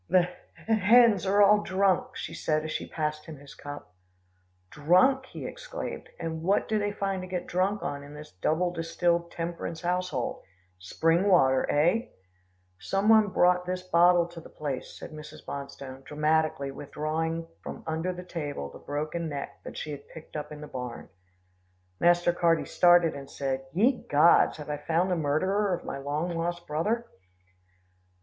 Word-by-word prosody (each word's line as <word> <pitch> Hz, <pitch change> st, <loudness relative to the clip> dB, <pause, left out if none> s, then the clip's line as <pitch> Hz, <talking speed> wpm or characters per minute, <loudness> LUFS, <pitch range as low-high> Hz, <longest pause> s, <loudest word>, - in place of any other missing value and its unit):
"The 185 Hz, -, +6 dB, 0.4 s
h -, -, -18 dB
h 225 Hz, -1 st, +3 dB
hens 225 Hz, -1 st, +6 dB
are 200 Hz, +2 st, +5 dB
all 210 Hz, +1 st, +6 dB
drunk," 190 Hz, -2 st, +1 dB
she -, -, -6 dB
said 155 Hz, -1 st, 0 dB
as 155 Hz, -, -4 dB
she -, -, -4 dB
passed 150 Hz, -1 st, -3 dB
him 160 Hz, -2 st, -8 dB
his 140 Hz, 0 st, -13 dB
cup. 145 Hz, -8 st, -9 dB, 0.8 s
"Drunk!" 220 Hz, -, +3 dB
he -, -, -8 dB
exclaimed, -, -, -6 dB
"and 160 Hz, -1 st, -4 dB
what 195 Hz, +5 st, +1 dB
do 215 Hz, -1 st, +1 dB
they 205 Hz, 0 st, -1 dB
find 195 Hz, -2 st, -2 dB
to 185 Hz, -, -7 dB
get 180 Hz, -1 st, -3 dB
drunk 190 Hz, +3 st, 0 dB
on 140 Hz, 0 st, -3 dB
in 145 Hz, +1 st, -11 dB
this 150 Hz, 0 st, -10 dB
double 175 Hz, +3 st, +1 dB
distilled 170 Hz, +1 st, 0 dB
temperance 170 Hz, -1 st, -5 dB
household? 180 Hz, -7 st, -2 dB, 0.4 s
Spring 165 Hz, -, +1 dB
water, 130 Hz, -8 st, +4 dB
eh?" 175 Hz, -, +2 dB, 0.7 s
"Some 195 Hz, +2 st, 0 dB
one 220 Hz, -1 st, +7 dB
brought 180 Hz, -1 st, +3 dB
this 180 Hz, 0 st, -3 dB
bottle 175 Hz, 0 st, +5 dB
to 170 Hz, -1 st, -10 dB
the -, -, -13 dB
place," 140 Hz, -4 st, -5 dB
said -, -, -9 dB
Mrs. 150 Hz, 0 st, -11 dB
Bonstone, 140 Hz, -1 st, -7 dB
dramatically 150 Hz, -2 st, 0 dB
withdrawing 155 Hz, +4 st, -3 dB
from -, -, -8 dB
under 160 Hz, +3 st, -1 dB
the 180 Hz, 0 st, -7 dB
table 145 Hz, -, -5 dB
the -, -, -12 dB
broken 155 Hz, +3 st, -3 dB
neck 140 Hz, -2 st, -6 dB
that -, -, -8 dB
she 150 Hz, -, -5 dB
had 140 Hz, -1 st, -8 dB
picked 160 Hz, -1 st, -13 dB
up 150 Hz, 0 st, -5 dB
in 150 Hz, 0 st, -8 dB
the 150 Hz, -, -7 dB
barn. 125 Hz, -3 st, -7 dB, 0.9 s
Master 175 Hz, 0 st, +4 dB
Carty 170 Hz, -2 st, +2 dB
started, 175 Hz, -2 st, +5 dB
and 140 Hz, -1 st, -9 dB
said, 135 Hz, -1 st, -3 dB
"Ye 235 Hz, -, +2 dB
gods! 150 Hz, +4 st, +5 dB
Have 150 Hz, -1 st, -6 dB
I 145 Hz, -, -2 dB
found 165 Hz, +5 st, 0 dB
the -, -, +2 dB
murderer 185 Hz, +6 st, +1 dB
of -, -, -10 dB
my -, -, -4 dB
long 150 Hz, +5 st, -2 dB
lost 175 Hz, +1 st, -3 dB
brother?" 210 Hz, +11 st, -1 dB
165 Hz, 170 wpm, -28 LUFS, 150-185 Hz, 0.9 s, one